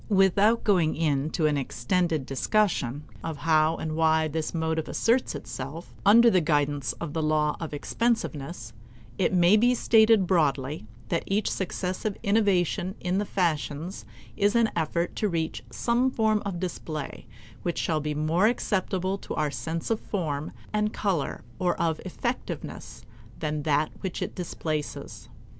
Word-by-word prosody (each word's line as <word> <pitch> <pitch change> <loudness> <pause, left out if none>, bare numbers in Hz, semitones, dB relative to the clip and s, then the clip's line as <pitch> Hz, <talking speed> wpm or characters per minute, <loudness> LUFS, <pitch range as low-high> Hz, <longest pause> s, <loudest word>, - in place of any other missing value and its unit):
Without 200 +3 +4
going 175 -7 +3
into 155 +1 0
an 150 -1 +2
extended 155 +3 0
discussion 145 - 0 0.2
of 160 -2 -4
how 155 +1 +3
and 155 -1 -4
why 160 0 +3
this 155 +1 -3
motive 160 -1 -1
asserts 240 +3 +1
itself 145 +6 -7
under 230 +4 +7
the 185 - +4
guidance 145 -3 +1
of 160 -4 -6
the 160 - -1
law 155 -1 +1
of 165 - -5
expensiveness, 150 - -2 0.5
it - - +2
may 180 +2 +5
be 245 +3 +4
stated 220 -3 +5
broadly 145 - 0 0.2
that 170 - +1
each 200 +2 +1
successive 190 +2 -3
innovation 195 -3 +2
in 180 +2 0
the 205 - -1
fashions 165 -1 -1 0.3
is 205 +2 +2
an 230 -2 +3
effort 170 +1 -1
to 210 - 0
reach 165 -2 -2
some 245 +2 +1
form 220 -4 +1
of 180 -3 -3
display 160 -4 -5 0.3
which 175 - -2
shall 160 -2 0
be 150 0 -3
more 160 +7 +2
acceptable 190 -4 0
to - - -6
our 150 -1 0
sense 165 +6 -3
of 225 - +1
form 155 -7 -3 0.2
and 210 0 +1
color 185 -9 -1 0.2
or 180 -1 0
of 160 -2 0
effectiveness, - - -5 0.3
than 150 -1 -2
that 150 +1 +1
which 190 -3 -3
it - - -5
displaces. 155 -4 -5
170 Hz, 150 wpm, -27 LUFS, 155-200 Hz, 0.5 s, under